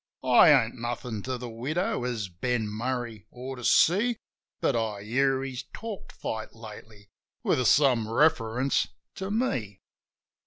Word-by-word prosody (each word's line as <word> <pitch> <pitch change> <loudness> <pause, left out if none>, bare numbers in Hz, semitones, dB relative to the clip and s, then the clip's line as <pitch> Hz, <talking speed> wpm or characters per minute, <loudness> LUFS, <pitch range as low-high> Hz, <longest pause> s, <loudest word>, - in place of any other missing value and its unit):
I - - +7
ain't - - +4
nothin' 120 -2 -4
to 130 -1 -2
the 125 0 -6
widow, 130 +6 -2
as 115 -5 -2
Ben 110 +5 -2
Murray 115 0 -4
ought 130 +2 -7
to 125 - -9
see; 210 - +4 0.4
But - - +1
I 110 -3 -2
hear 135 +4 +1
he's 130 -2 -4
talked 220 -3 -7
fight 110 0 -5
lately, 110 -2 -12 0.3
with 130 - +2
some 125 -6 +4
reference 130 -1 +2 0.3
to 190 0 -5
me. 130 - -1
125 Hz, 140 wpm, -27 LUFS, 110-135 Hz, 0.4 s, I